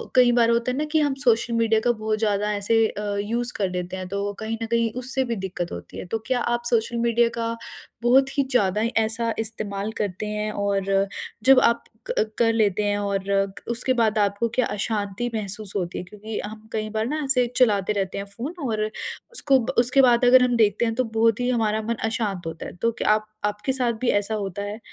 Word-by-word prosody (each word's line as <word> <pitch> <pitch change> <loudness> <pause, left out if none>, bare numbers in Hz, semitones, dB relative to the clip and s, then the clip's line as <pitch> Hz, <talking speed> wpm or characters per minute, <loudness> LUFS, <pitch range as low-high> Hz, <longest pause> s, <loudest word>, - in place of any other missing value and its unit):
कई 250 -1 +6
बार 235 -1 +4
होता 235 +1 +1
है 255 - -3
ना 300 - 0
कि 315 - +3
हम 290 -2 +1
सोशल 235 -1 +2
मीडिया 225 -1 +3
का 240 - +5
बहुत 215 -1 -2
ज़्यादा 210 -1 +1
ऐसे 220 +2 +2
अ, 205 -1 -4
यूज़ 240 +3 -1
कर 195 -3 0
लेते 180 0 -4
हैं 185 -1 -5
तो 200 +2 -3
कहीं 220 +1 -3
न - - -1
कहीं 230 -1 +1
उससे 260 +1 -1
भी - - 0
दिक़्क़त 185 -3 -4
होती - - -8
है। - - -6
तो 225 +5 -3
क्या 255 -1 +1
आप 240 0 -1
सोशल 235 0 +1
मीडिया 235 0 +2
का 230 0 -1 0.5
बहुत 265 +3 +3
ही 280 - +4
ज़्यादा 210 -4 +2 0.2
ऐसा 230 +1 0
इस्तेमाल 215 -2 -3
करते 205 -1 -3
हैं 210 0 -2
और 195 -1 0 0.4
जब 265 0 +7
आप 235 -1 +2 0.2
क 215 0 0
कर 230 -1 +3
लेते 210 -2 +1
हैं 205 0 +1
और 200 -1 -1 0.5
उसके 255 +2 0
बाद 220 -1 +2
आपको 205 +3 +1
क्या 255 - +3
अशांति 205 +2 -2
महसूस 210 -1 -2
होती 180 -3 -2
है? - - -4
क्योंकि 210 +3 -7
हम 215 +1 -10
कई 215 -1 -2
बार 220 +1 -1
ना 305 +4 -2
ऐसे 270 -2 +2
चलाते 210 -5 +3
रहते 195 -1 -2
हैं 200 - -4
फ़ोन 235 - -6
और 215 -2 -1 0.5
उसको 275 - +5 0.2
उसके 250 +3 +4
बाद 245 -1 +4
अगर 250 +1 +7
हम 245 -1 +2
देखते 215 +1 +3
हैं 225 - 0
तो 255 - +1
बहुत 225 -1 +1
ही 245 0 0
हमारा 220 -3 +1
मन 230 +2 -2
अशांत 215 -5 -2
होता 165 -1 -6
है। - - -8
तो 230 - +2
क्या 220 - -2
आप 215 0 -1 0.2
आपके 210 +4 -1
साथ 245 -3 +1
भी 255 - +1
ऐसा 205 +2 -2
होता 200 -1 -4
है? 205 +2 -5
220 Hz, 220 wpm, -24 LUFS, 205-235 Hz, 0.5 s, जब